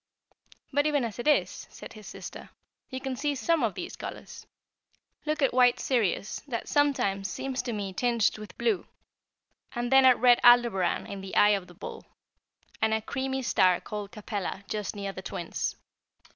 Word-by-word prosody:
"But 290 +2 +3
even 290 -3 +1
as 230 0 -6
it 240 - -3
is," 300 - +1
said - - -11
his 215 -2 -12
sister, - - -9 0.4
"you 260 - -4
can 265 -1 -4
see 290 +2 -1
some 330 +4 +1
of 225 -5 0
these - - -6
colors. - - -9 0.8
Look 305 -1 0
at 270 - +3
white 245 -1 +5
Sirius, 215 -6 0
that 235 -4 -4
sometimes 230 -10 +1
seems 265 +4 -3
to 245 - -4
me 200 -3 -4
tinged 235 0 +1
with 210 - -10
blue, 435 -5 0 0.9
and 240 +1 -2
then 265 0 +7
at 255 -1 +7
red 245 0 +5
Aldebaran 235 -7 +5
in 200 -1 -7
the 190 0 -7
eye 205 - +6
of 195 -3 +1
the 175 - -15
bull, - - -9 0.7
and 220 0 +3
a 220 - -1
creamy 265 0 -2
star 185 -6 +3
called 205 -1 -6
Capella 205 -2 -5
just 210 +1 -3
near 200 -1 -4
the 190 - -7
Twins. 175 -1 -4
235 Hz, 175 wpm, -28 LUFS, 200-265 Hz, 0.9 s, then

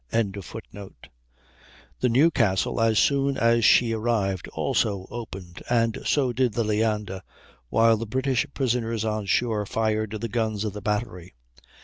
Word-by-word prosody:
] - - -42
The 100 -2 -4 1.2
Newcastle, 115 - +2
as 115 -1 +3
soon 140 +4 +2
as 115 0 +3
she 115 +2 +5
arrived, 110 -5 -1
also 100 -3 -1
opened, 95 -7 -8
and 115 -2 +1
so 130 -4 +1
did 125 -2 +1
the 115 - 0
Leander, 105 -3 -1 0.5
while 115 0 +4
the 115 +1 -5
British 130 +3 0
prisoners 115 -4 -1
on 110 -2 -2
shore 110 0 +1
fired 110 0 0
the 115 - -3
guns 110 -2 -1
of 105 -3 -3
the 105 - -7
battery. 105 - -3
110 Hz, 135 wpm, -25 LUFS, 105-120 Hz, 1.2 s, she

